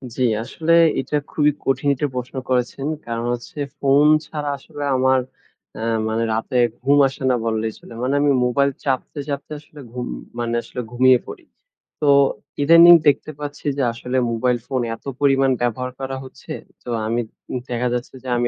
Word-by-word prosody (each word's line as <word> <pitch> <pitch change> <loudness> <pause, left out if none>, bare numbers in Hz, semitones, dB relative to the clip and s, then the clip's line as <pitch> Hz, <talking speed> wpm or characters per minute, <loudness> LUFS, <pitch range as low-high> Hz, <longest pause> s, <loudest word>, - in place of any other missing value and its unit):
জি। 130 - 0 0.2
আসলে 160 +7 -2 0.3
এটা 150 - -3 0.2
খুবই 150 -1 +3
কঠিন 135 +2 0
এটা 145 +2 -1
প্রশ্ন 125 +2 -5
করেছেন, 125 +2 -1 0.2
কারণ 115 0 -3
হচ্ছে 120 +4 -7 0.2
ফোন 140 +1 +4 0.2
ছাড়া 150 -1 -4
আসলে 145 +1 -8
আমার 130 0 +3 0.6
অ্যা 110 - -4 0.2
মানে 110 +1 0
রাতে 115 +4 -1 0.2
ঘুম 140 +3 +3
আসে 135 0 -8
না 125 - +3
বল্লেই 110 -1 -1
চলে। - - -13
মানে 130 +2 0
আমি 145 0 +3
মোবাইল 140 +3 +2
চাপতে, 135 +2 -2
চাপতে 140 +1 -4
আসলে 150 0 -16
ঘুম, 125 0 -5 0.3
মানে 120 0 -2
আসলে 125 - -6
ঘুমিয়ে 130 +1 +5
পড়ি। 350 - -9 0.6
তো 150 - +1 0.6
ইদানিং 165 +3 +9
দেখতে 145 +2 +2
পাচ্ছি 145 0 -7
যে 135 - +1
আসলে 125 +2 -3
মোবাইল 120 +2 +1
ফোন 130 -2 -1
এত - - -23
পরিমাণ 135 -1 +3
ব্যবহার 125 +1 -1
করা 135 0 -4
হচ্ছে, 130 - -12 0.3
তো - - -20 0.2
আমি 115 +2 0 0.5
দেখা 125 0 -1
যাচ্ছে 125 +1 -4
যে, 130 - -9
আমি 120 0 +1
130 Hz, 170 wpm, -21 LUFS, 120-145 Hz, 0.6 s, ইদানিং